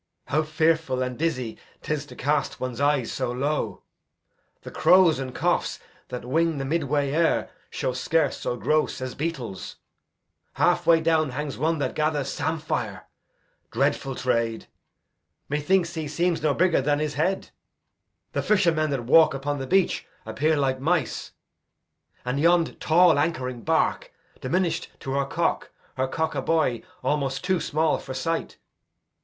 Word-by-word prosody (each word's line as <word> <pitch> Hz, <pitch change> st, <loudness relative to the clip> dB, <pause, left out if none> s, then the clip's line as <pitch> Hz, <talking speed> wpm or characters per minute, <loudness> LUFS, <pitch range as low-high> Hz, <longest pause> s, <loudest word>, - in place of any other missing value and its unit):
How 155 Hz, -, +2 dB
fearful 155 Hz, -4 st, +1 dB
And 125 Hz, 0 st, -3 dB
dizzy 130 Hz, -7 st, -2 dB, 0.2 s
'tis 150 Hz, -1 st, -2 dB
to -, -, -12 dB
cast 145 Hz, +4 st, -1 dB
one's 130 Hz, 0 st, -4 dB
eyes 145 Hz, -4 st, +2 dB
so 130 Hz, -2 st, -2 dB
low! 140 Hz, +5 st, -2 dB, 0.8 s
The -, -, -8 dB
crows 180 Hz, -6 st, +5 dB
and 130 Hz, -1 st, -4 dB
choughs -, -, 0 dB, 0.3 s
that 125 Hz, -1 st, -6 dB
wing 165 Hz, +4 st, +1 dB
the 135 Hz, -, -3 dB
midway 145 Hz, -2 st, 0 dB
air 165 Hz, +3 st, +1 dB, 0.2 s
Show 130 Hz, -, -2 dB
scarce 160 Hz, +6 st, +1 dB
so 120 Hz, -, -3 dB
gross 150 Hz, +8 st, +1 dB
as 130 Hz, -1 st, -4 dB
beetles. 135 Hz, -, -5 dB, 0.8 s
Halfway 165 Hz, -1 st, +3 dB
down 160 Hz, -2 st, +2 dB
Hangs 140 Hz, +2 st, -4 dB
one 160 Hz, +3 st, +1 dB
that 145 Hz, -, -2 dB
gathers 150 Hz, -3 st, 0 dB
sampire 160 Hz, -1 st, -3 dB, 0.6 s
dreadful 135 Hz, -1 st, 0 dB
trade! 115 Hz, -3 st, -1 dB, 0.8 s
Methinks 170 Hz, +4 st, +1 dB
he 160 Hz, -2 st, -4 dB
seems 170 Hz, +3 st, 0 dB
no 150 Hz, -2 st, +1 dB
bigger 175 Hz, -4 st, +3 dB
than 145 Hz, +2 st, +1 dB
his 150 Hz, 0 st, -2 dB
head. 185 Hz, +6 st, -1 dB, 0.8 s
The -, -, -1 dB
fishermen 170 Hz, -7 st, +2 dB
that 135 Hz, -4 st, -2 dB
walk 155 Hz, +4 st, +5 dB
upon 145 Hz, +1 st, -2 dB
the 135 Hz, -, -4 dB
beach 190 Hz, +5 st, +1 dB, 0.2 s
Appear 155 Hz, +2 st, +1 dB
like 135 Hz, -2 st, 0 dB
mice; 155 Hz, -2 st, -1 dB, 0.9 s
and 125 Hz, +3 st, -1 dB
yond 170 Hz, +1 st, +3 dB
tall 170 Hz, -2 st, +5 dB
anchoring 130 Hz, -6 st, -1 dB
bark, 165 Hz, -, 0 dB, 0.3 s
Diminish'd 185 Hz, -2 st, -1 dB
to 135 Hz, -, -5 dB
her 140 Hz, 0 st, +1 dB
cock; -, -, -1 dB, 0.3 s
her 130 Hz, 0 st, 0 dB
cock, 160 Hz, +4 st, -1 dB
a -, -, -2 dB
buoy 155 Hz, -7 st, +1 dB, 0.2 s
Almost 135 Hz, -1 st, -1 dB
too 185 Hz, -1 st, +1 dB
small 155 Hz, 0 st, +1 dB
for 130 Hz, -, -7 dB
sight. 165 Hz, +5 st, -2 dB
150 Hz, 145 wpm, -25 LUFS, 130-165 Hz, 0.9 s, crows